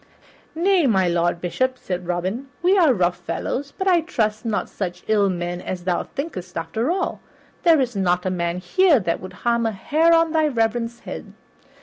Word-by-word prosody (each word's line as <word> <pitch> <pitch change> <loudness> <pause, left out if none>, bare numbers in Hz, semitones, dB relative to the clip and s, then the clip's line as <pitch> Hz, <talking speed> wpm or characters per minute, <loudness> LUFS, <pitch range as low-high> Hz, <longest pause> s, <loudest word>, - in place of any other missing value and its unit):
"Nay, 355 -2 +3
my 190 -6 +3
Lord 175 0 +1
Bishop," 255 +9 -1
said 180 -5 -5
Robin, 185 +9 -2 0.2
"we 370 +3 +5
are 340 -7 +5
rough 180 -6 +1
fellows, 280 +2 -3
but 380 - -2
I 355 -3 +5
trust 215 -10 -1
not 210 -5 -1
such 180 -3 -5
ill 205 -2 +3
men 175 -1 -3
as 180 -1 -5
thou 180 -1 0
thinkest, 190 - -6
after 220 - -2
all. 370 +2 -1 0.4
There 330 -4 +5
is 250 -4 -1
not 180 -2 +1
a 185 - 0
man 170 -1 -1
here 290 - +3
that 170 -4 -1
would 185 - -9
harm 235 -1 +2
a - - 0
hair 305 - +2
of 330 -1 +4
thy 315 -1 +3
reverence's 235 -2 -1
head. - - -8
220 Hz, 190 wpm, -22 LUFS, 180-300 Hz, 0.4 s, we